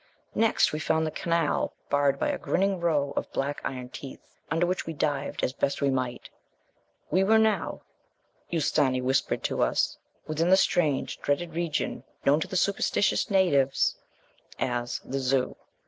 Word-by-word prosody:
Next 225 -7 +3
we 155 - -2
found 160 +1 +1
the 155 - -2
canal 165 -2 0 0.2
barred 140 -1 +3
by - - 0
a - - -2
grinning 195 0 0
row 150 -5 +1
of - - -3
black 140 +2 -2
iron 125 -2 -4
teeth, 135 +1 -9 0.3
under 165 +3 +2
which 180 0 -2
we 165 - -3
dived 145 -2 -2
as 125 - +1
best 140 - -1
we 140 -1 +2
might. 130 -2 -2 0.8
We 185 +4 +4
were 220 +3 +5
now, 220 -1 +1 0.7
Ustâni 145 -5 +2
whispered 130 +1 0
to - - -1
us, - - +1 0.3
within 160 +3 0
the 190 - +7
strange 155 -7 +1
and - - -28
dreaded 160 +4 -1
region 165 -2 -2 0.2
known 145 +2 +5
to - - -3
the 185 - -2
superstitious 200 +2 +1
natives 145 -9 +3 0.6
as 120 -1 -2
the 135 +1 -3
Zû. 130 0 +1
150 Hz, 165 wpm, -27 LUFS, 135-175 Hz, 0.8 s, the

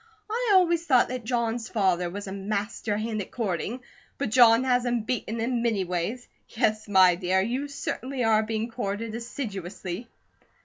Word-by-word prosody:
I 465 -1 +1
always 340 -3 +4
thought 255 -4 +4
that 250 -2 -5
John's 235 -1 -1
father 185 -5 +1
was 200 +3 -6
a 190 - -6
master 205 +2 -2
hand 215 0 -2
at 190 - -7
courting, 225 +2 -3 0.4
but 270 -6 -2
John 235 0 +6
has 250 -1 +2
him 240 -1 0
beaten 230 -1 -3
in 235 +1 0
many 225 -5 +1
ways. 180 +8 -3 0.2
Yes, 215 -2 0
my 190 -3 +6
dear, 185 +2 +1
you 245 +8 -1
certainly 270 -2 -4
are 220 -1 +4
being 220 +1 -3
courted 225 -1 -3
assiduously." 205 -4 -5
225 Hz, 165 wpm, -26 LUFS, 200-245 Hz, 0.4 s, John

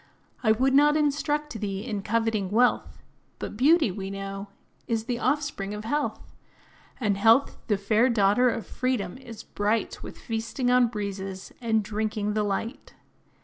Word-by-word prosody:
I 220 - +3
would 260 +5 +2
not 295 +2 +5
instruct 295 -2 0
thee 200 -1 -3
in 205 -2 -3
coveting 220 -2 0
wealth; 240 +4 +1 0.3
But - - -6
beauty, 290 - +4
we 195 +1 -5
know, 195 0 -6 0.4
is 225 -1 0
the 240 0 -3
offspring 260 -8 -1
of 210 - -6
health; 290 +5 -2 0.7
And 210 -5 +1
health, 225 +6 +4
the 210 -3 +2
fair 215 +5 +2
daughter 230 +2 +4
of 230 -1 -3
freedom, 240 -8 -2
is 230 -4 -10
bright 210 +2 -1
With - - -9
feasting 230 +2 -2
on 250 -1 +5
breezes, 195 -3 -5
and 220 -2 +1
drinking 210 0 -2
the 215 - +1
light. 210 +5 -3
225 Hz, 150 wpm, -26 LUFS, 205-250 Hz, 0.7 s, not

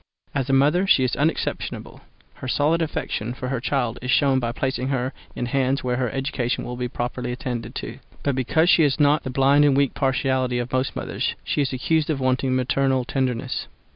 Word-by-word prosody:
As 135 0 -1
a - - +2
mother 150 +8 +3
she 130 - +5
is 125 - 0
unexceptionable; 155 +2 -2 0.4
her - - -7
solid 150 +6 +2
affection 125 -6 -3
for 130 0 -5
her 135 -2 -1
child 125 -2 -1
is 125 - -5
shown 135 -1 +4
by 120 -2 -1
placing 130 +1 -2
her 130 -1 -1 0.2
in 125 - -2
hands 135 +1 0
where 125 -1 0
her 125 -2 0
education 130 -1 -2
will 125 - -5
be 125 0 -2
properly 125 0 -4
attended 125 -1 -5
to; - - -6 0.2
but 140 - +1
because 135 +6 +2
she 175 - +6
has 145 -1 +2
not 145 +1 +4
the 130 - -5
blind 135 +3 +4
and 140 -2 +4
weak 140 -2 +2
partiality 130 -1 0
of 120 +1 -4
most 130 +1 0
mothers, - - -2
she - - 0
is 135 - 0
accused 155 +4 0
of 150 -3 0
wanting 130 0 +1
maternal 130 0 +1
tenderness. 130 -1 -2
130 Hz, 200 wpm, -23 LUFS, 125-140 Hz, 0.4 s, she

